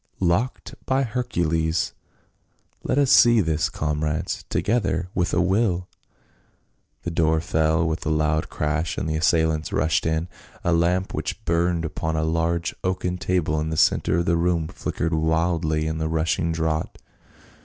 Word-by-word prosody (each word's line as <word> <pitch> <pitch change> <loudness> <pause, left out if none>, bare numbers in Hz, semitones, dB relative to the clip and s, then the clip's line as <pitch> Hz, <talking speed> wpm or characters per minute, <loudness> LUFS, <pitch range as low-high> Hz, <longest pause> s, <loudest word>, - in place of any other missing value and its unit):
" - - -38
Locked, 120 +8 -2
by 135 +1 +2
Hercules! 85 -10 -1 0.9
Let - - -1
us 140 -2 +3
see 120 -1 +7
to 105 - +4
this, 80 -1 0
comrades. 75 +1 -2
Together! 95 -6 0
with 90 -1 0
a - - +1
will 90 -1 +1 0.6
!" - - -43
The 85 - -3
door 80 -1 +2
fell 80 +1 +1
with 80 +1 -2
a - - +2
loud 80 0 +1
crash 75 +2 -2
and - - -2
the 80 - -1
assailants 80 -1 +1
rushed 80 0 +1
in. 80 +1 0 0.4
A 85 - +2
lamp 90 +3 +1
which - - -4
burned 85 0 +1
upon 80 0 -3
a 80 - 0
large 85 +1 0
oaken 90 -1 -1
table 80 -5 0
in 80 +1 -2
the 80 - -3
centre - - +3
of 85 - 0
the 85 0 +2
room 85 -2 +1
flickered 85 0 -3
wildly 80 0 +1
in 80 0 -2
the 80 0 -1
rushing 80 +1 0
draught. 80 -1 -2
80 Hz, 165 wpm, -23 LUFS, 80-90 Hz, 0.9 s, see